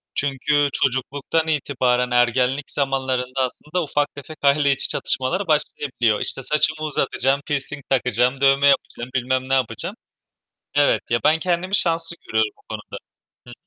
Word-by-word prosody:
Çünkü 145 +1 +1
çocukluktan 140 +4 -1
itibaren 125 -5 0
ergenlik 125 +3 +1
zamanlarında 130 -2 -1
aslında 150 +7 -4
ufak 145 -1 -2
tefek 150 +2 -10
aile 140 0 +4
içi 135 - +2
çatışmalar 170 +9 +1
başlayabiliyor. 130 -7 0
İşte, 135 - -2
saçımı 155 +2 +1
uzatacağım, 140 -1 0
pirsing 145 -1 -2
takacağım, 125 0 +1
dövme 135 +1 +4
yapacağım, 130 -3 0
bilmem 130 +1 -1
ne - - +1
yapacağım. 130 -4 -1 0.8
Evet, 145 0 +3
ya, 120 - +2
ben 160 +1 +3
kendimi 180 +3 0
şanslı 165 -2 +2
görüyorum 110 -1 +1
o - - -27
konuda. - - -7 0.5
Hı. 120 - -11
135 Hz, 135 wpm, -21 LUFS, 130-150 Hz, 0.8 s, aile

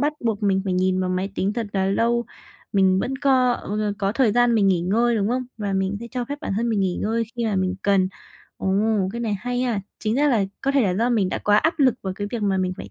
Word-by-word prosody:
bắt 295 +1 +1
buộc 220 -2 -1
mình 195 -1 +2
phải 190 - -1
nhìn 185 0 +1
vào 185 0 -1
máy 185 +2 -1
tính 195 +2 0
thật 230 -1 -3
là 190 -1 +1
lâu, 235 +4 +1 0.5
mình 190 -1 +3
vẫn 265 +5 -2
có, 260 -3 +3
ừ, 210 -2 -3
ờ, 205 -1 0
có 200 0 0
thời 230 -3 +2
gian 245 0 +3
mình 205 -3 +3
nghỉ 180 -3 +2
ngơi, 230 +6 +1
đúng 205 0 0
không? 255 +1 0 0.2
Và 200 -2 -2
mình 190 +1 0
sẽ 235 - -6
cho 250 -2 -3
phép 285 +3 -6
bản 200 - -3
thân 235 +1 0
mình 215 -3 +1
nghỉ 185 -2 0
ngơi 230 +2 0
khi 235 - -1
mà 205 -3 0
mình 185 0 0
cần. 195 -2 +3 0.5
Ồ, 190 - -3 0.4
cái 235 - -4
này 220 -3 -1
hay 245 0 -2
ha! 230 -5 0 0.2
Chính 215 +1 -1
ra 290 +2 +3
là 220 -7 +2 0.2
có 275 - 0
thể 275 -1 +3
là 185 -3 +1
do 235 +5 +1
mình 205 -6 +2
đã - - -2
quá 205 0 +3
áp 320 +8 +2
lực 260 -5 +4
vào 190 -1 -3
cái 205 - -3
việc 230 -3 -3
mà 195 -2 +1
mình 185 0 0
phải 100 - -9
210 Hz, 285 wpm, -23 LUFS, 190-240 Hz, 0.5 s, lực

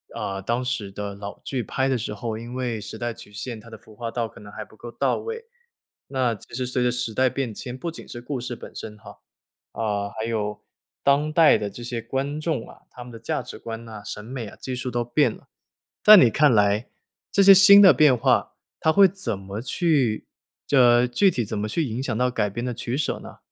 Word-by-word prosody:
呃， 95 0 -4
当 120 +5 -1
时 120 -5 -3
的 100 +1 -6
老 100 0 -8
剧 130 -3 -3
拍 130 +3 -1
的 130 - +1
时 110 -2 -4
候 110 +1 -4
因 120 +2 -8
为 125 -3 -2
时 105 +2 -8
代 120 +1 -3
曲 105 - -14
线， 110 +2 -6
它 115 - -14
的 110 - -10
服 110 - -16
化 115 +2 -5
道 115 -1 -3
可 - - -15
能 105 - -12
还 110 +1 -7
不 110 - -19
够 120 - -9
到 125 +3 0
位， 455 0 -6 0.6
那 130 -3 0
其 110 - -13
实 130 +1 -2
随 125 0 -1
着 125 - +3
时 125 -2 -2
代 130 +4 +3
变 125 -3 -3
迁， 125 +4 -7
不 170 +5 -4
仅 - - -10
是 120 - -8
故 130 +2 -4
事 125 0 -5
本 - - -11
身 105 -1 -8
哈， - - -14 0.5
啊， 105 -2 -2
还 110 - -3
有 105 -2 -3 0.4
当 145 +2 +3
代 160 -1 +6
的 105 - -4
这 120 +4 -10
些 120 -1 -4
观 140 +5 -3
众 155 -6 -2
啊， - - -16
他 125 - -10
们 120 - -12
的 115 - -10
价 115 - -2
值 - - -10
观 115 0 -7
啊， 105 -2 -8
审 105 - -6
美 120 0 -6
啊 - - -12
技 130 - -6
术 125 0 -3
都 120 -1 -1
变 120 +3 +2
了。 - - -12 0.5
在 215 0 +10
你 125 - +6
看 150 +4 +4
来 105 +1 +2 0.4
这 200 - +3
些 195 0 +10
新 200 +1 +9
的 190 -3 +9
变 150 -5 +5
化， - - +1 0.3
它 160 - +3
会 195 +4 +7
怎 170 - -3
么 100 +2 -6
去 135 -5 0 0.4
这 125 -2 +5
具 190 +11 +3
体 120 -8 -2
怎 110 - -4
么 105 +1 -2
去 165 +9 0
影 120 0 -4
响 125 - -2
到 125 +1 +2
改 105 -4 -1
编 120 +5 -5
的 125 - -2
取 120 +2 -4
舍 155 - -1
呢？ - - -12
120 Hz, 260 characters per minute, -24 LUFS, 110-135 Hz, 0.6 s, 在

